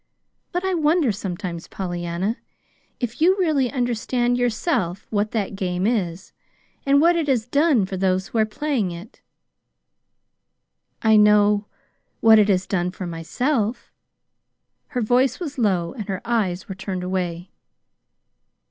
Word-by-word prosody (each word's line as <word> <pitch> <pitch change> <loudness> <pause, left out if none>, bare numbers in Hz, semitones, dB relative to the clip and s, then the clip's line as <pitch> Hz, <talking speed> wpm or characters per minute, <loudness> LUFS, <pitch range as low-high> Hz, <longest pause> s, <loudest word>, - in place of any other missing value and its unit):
"But 355 +1 -2
I 380 - 0
wonder 315 -4 +2
sometimes, 180 -3 -5
Pollyanna, 175 +3 -3 0.6
if 245 +2 -4
you 370 +4 +5
really 305 -9 +1
understand 245 -1 0
yourself 240 - -1
what 210 0 0
that 205 -3 -2
game 180 -1 -2
is, 190 -6 -2 0.5
and 280 +1 +5
what 340 +3 +4
it 330 -3 0
has 250 -5 +1
done 280 - +3
for 190 0 -5
those 190 0 0
who 230 - -1
are 215 - +4
playing 245 -3 -1
it." 175 +7 -10 1.8
"I 220 -1 +5
know 210 0 +4 0.5
what 220 -1 +7
it 210 0 +3
has 190 -1 +2
done 180 -2 -1
for 185 0 -7
myself." 220 - -2 1.0
Her 250 - -3
voice 250 +4 +2
was 295 -6 -5
low, 180 -7 +1
and 210 -3 -7
her 190 -2 -3
eyes 205 -6 -1
were 195 - -5
turned 185 -1 -5
away. 180 -1 -3
215 Hz, 140 wpm, -22 LUFS, 185-250 Hz, 1.8 s, what